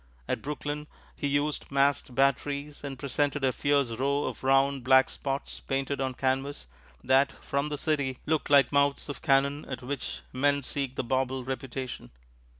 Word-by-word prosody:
At -, -, -1 dB
Brooklyn, 150 Hz, +1 st, -4 dB, 0.3 s
he 145 Hz, -, -2 dB
used 145 Hz, +1 st, 0 dB
masked 140 Hz, -2 st, +1 dB
batteries, 140 Hz, +2 st, 0 dB
and 140 Hz, -2 st, -5 dB
presented 140 Hz, +1 st, -1 dB
a 130 Hz, -, +2 dB
fierce 140 Hz, -4 st, +2 dB
row 140 Hz, +5 st, 0 dB
of -, -, -5 dB
round, 135 Hz, 0 st, +3 dB
black 130 Hz, +1 st, +5 dB
spots 135 Hz, 0 st, -4 dB
painted 135 Hz, +1 st, -2 dB
on 130 Hz, -1 st, -1 dB
canvas 135 Hz, -, -1 dB, 0.4 s
that, 135 Hz, +2 st, +4 dB
from 140 Hz, +2 st, -1 dB
the 145 Hz, -, -3 dB
city, 140 Hz, -4 st, 0 dB
looked 155 Hz, -1 st, 0 dB
like 140 Hz, -1 st, +6 dB
the -, -, -11 dB
mouths 140 Hz, +1 st, +2 dB
of 145 Hz, -, -5 dB
cannon 140 Hz, +2 st, +2 dB
at 130 Hz, -1 st, -6 dB
which 140 Hz, +1 st, -4 dB
men 140 Hz, +2 st, +2 dB
seek 135 Hz, 0 st, -3 dB
the -, -, -1 dB
bauble 130 Hz, +1 st, 0 dB
reputation. 130 Hz, -, -5 dB
140 Hz, 165 wpm, -28 LUFS, 130-145 Hz, 0.4 s, like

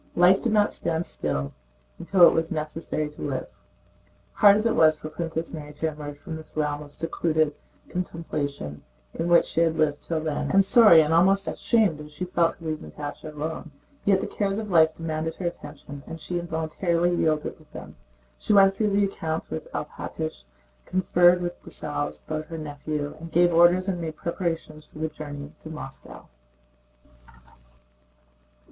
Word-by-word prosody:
Life 180 Hz, +2 st, +5 dB
did 235 Hz, -, 0 dB
not 210 Hz, -1 st, +3 dB
stand 165 Hz, 0 st, -1 dB
still 70 Hz, -2 st, -2 dB, 0.5 s
and -, -, -9 dB
it 180 Hz, -3 st, +8 dB
was 165 Hz, 0 st, 0 dB
necessary 155 Hz, -1 st, -3 dB
to 150 Hz, -, -13 dB
live. -, -, -4 dB, 0.8 s
Hard 205 Hz, -2 st, +7 dB
as 215 Hz, +2 st, 0 dB
it 230 Hz, -, +3 dB
was 155 Hz, -1 st, +5 dB
for 155 Hz, -, -7 dB
Princess 165 Hz, 0 st, -4 dB
Mary 150 Hz, -2 st, -7 dB
to 160 Hz, +2 st, -1 dB
emerge 145 Hz, -1 st, -8 dB
from 160 Hz, +2 st, -7 dB
the 155 Hz, -, -12 dB
realm 150 Hz, -1 st, -1 dB
of 145 Hz, -1 st, -11 dB
secluded 160 Hz, -1 st, 0 dB, 0.3 s
contemplation 145 Hz, -, -4 dB, 0.3 s
in 165 Hz, -, -2 dB
which 175 Hz, 0 st, +5 dB
she 165 Hz, -, -1 dB
had 165 Hz, -1 st, +2 dB
lived 150 Hz, -2 st, +1 dB
till 165 Hz, -1 st, -2 dB
then, 155 Hz, -2 st, -2 dB
and 195 Hz, 0 st, +5 dB
sorry 210 Hz, -7 st, +8 dB
and 155 Hz, +1 st, +1 dB
almost 195 Hz, +4 st, +4 dB
ashamed 205 Hz, -10 st, +1 dB
as 150 Hz, 0 st, -11 dB
she 180 Hz, +5 st, -4 dB
felt 175 Hz, -2 st, +1 dB
to 165 Hz, -, -14 dB
leave 155 Hz, -1 st, -2 dB
Natásha 150 Hz, 0 st, -8 dB
alone, 155 Hz, +2 st, -5 dB, 0.3 s
yet 195 Hz, -1 st, +3 dB
the -, -, -2 dB
cares 200 Hz, -1 st, -2 dB
of 215 Hz, -2 st, -4 dB
life 160 Hz, -2 st, +5 dB
demanded 160 Hz, 0 st, -3 dB
her 185 Hz, -, -6 dB
attention 145 Hz, -4 st, -7 dB
and 165 Hz, -, -7 dB
she 175 Hz, +1 st, -3 dB
involuntarily 170 Hz, +1 st, 0 dB
yielded 155 Hz, -3 st, 0 dB
to -, -, -20 dB
them. -, -, -10 dB, 0.4 s
She -, -, 0 dB
went 195 Hz, -1 st, +7 dB
through 210 Hz, +2 st, 0 dB
the 200 Hz, 0 st, +2 dB
accounts 160 Hz, -4 st, -4 dB
with 80 Hz, -, -6 dB
Alpátych, -, -, -5 dB, 0.4 s
conferred 180 Hz, -1 st, +3 dB
with 175 Hz, 0 st, -5 dB
Dessalles 145 Hz, -1 st, -3 dB
about 155 Hz, 0 st, -4 dB
her 165 Hz, -, -6 dB
nephew, 145 Hz, -1 st, -4 dB
and 165 Hz, 0 st, -9 dB
gave 175 Hz, 0 st, +4 dB
orders 175 Hz, +3 st, +5 dB
and 180 Hz, -3 st, -2 dB
made 160 Hz, -1 st, -4 dB
preparations 165 Hz, -3 st, -4 dB
for -, -, -17 dB
the 160 Hz, +1 st, -2 dB
journey 145 Hz, -1 st, -8 dB
to 155 Hz, -, -10 dB
Moscow. 150 Hz, -4 st, -9 dB
160 Hz, 175 wpm, -25 LUFS, 150-175 Hz, 0.8 s, it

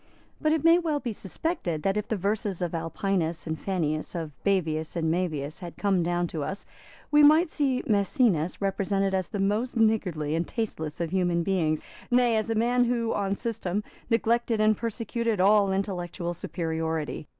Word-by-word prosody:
But 310 Hz, -, +2 dB
it 315 Hz, -2 st, +1 dB
may 330 Hz, +1 st, +6 dB
well 315 Hz, -4 st, 0 dB
be 240 Hz, -5 st, -4 dB
suspected 195 Hz, -, -3 dB
that, 195 Hz, 0 st, +1 dB
if 210 Hz, 0 st, -2 dB
the 220 Hz, -, 0 dB
verses 200 Hz, 0 st, -1 dB
of 175 Hz, -2 st, -2 dB
Alpinus 165 Hz, 0 st, -1 dB
and 160 Hz, -1 st, -2 dB
Fannius, 155 Hz, -3 st, -2 dB
of 165 Hz, -3 st, -4 dB
Bavius 160 Hz, -6 st, 0 dB
and 160 Hz, -2 st, 0 dB
Maevius, 155 Hz, -4 st, -2 dB
had 175 Hz, -2 st, -8 dB
come 195 Hz, -3 st, +2 dB
down 175 Hz, +1 st, 0 dB
to 155 Hz, -3 st, -3 dB
us, 195 Hz, +6 st, -5 dB, 0.5 s
we 295 Hz, 0 st, +6 dB
might 310 Hz, +3 st, +6 dB
see 270 Hz, -4 st, 0 dB
Maecenas 200 Hz, -, +2 dB
represented 195 Hz, 0 st, 0 dB
as 185 Hz, -2 st, 0 dB
the -, -, -5 dB
most 215 Hz, +6 st, 0 dB
niggardly 185 Hz, -9 st, +1 dB
and 165 Hz, +2 st, 0 dB
tasteless 160 Hz, -10 st, -4 dB
of 165 Hz, -1 st, -2 dB
human 175 Hz, -2 st, +1 dB
beings, 165 Hz, -5 st, 0 dB, 0.3 s
nay 245 Hz, -2 st, +4 dB
as 220 Hz, +1 st, 0 dB
a 225 Hz, -, 0 dB
man 245 Hz, +2 st, +3 dB
who, 235 Hz, -1 st, 0 dB
on 200 Hz, -1 st, 0 dB
system, 210 Hz, -3 st, -2 dB, 0.3 s
neglected 230 Hz, 0 st, +1 dB
and 215 Hz, 0 st, +4 dB
persecuted 230 Hz, 0 st, -2 dB
all 200 Hz, +1 st, +5 dB
intellectual 180 Hz, -2 st, -2 dB
superiority. 160 Hz, -3 st, -3 dB
195 Hz, 170 wpm, -27 LUFS, 170-225 Hz, 0.5 s, may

